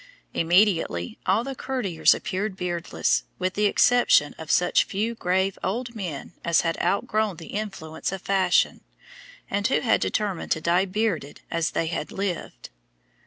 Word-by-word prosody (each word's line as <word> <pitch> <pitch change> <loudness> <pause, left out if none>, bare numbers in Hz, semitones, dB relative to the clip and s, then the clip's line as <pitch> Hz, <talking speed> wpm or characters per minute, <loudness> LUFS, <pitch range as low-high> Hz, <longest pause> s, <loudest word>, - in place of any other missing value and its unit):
Immediately 165 - +2
all 200 +5 +3
the 270 +2 -4
courtiers 245 -11 +1
appeared 195 +1 -3
beardless, 170 - 0
with 185 0 -1
the 210 +1 +2
exception 245 +4 +4
of - - -8
such - - +3
few 215 +4 -2
grave 190 -2 0
old 235 +4 -2
men 180 - -6
as 170 -1 +3
had 165 -1 -1
outgrown 215 0 0
the 165 - -10
influence 195 -8 -4
of 195 -1 -6
fashion, 190 -2 +2 0.7
and 205 +2 0
who 260 - +1
had 235 - +2
determined 205 -5 -1
to - - -4
die 175 +4 +2
bearded 185 -7 -2
as 165 -1 0
they - - -1
had 160 -2 -3
lived. 195 -3 -4
190 Hz, 150 wpm, -25 LUFS, 170-215 Hz, 0.7 s, exception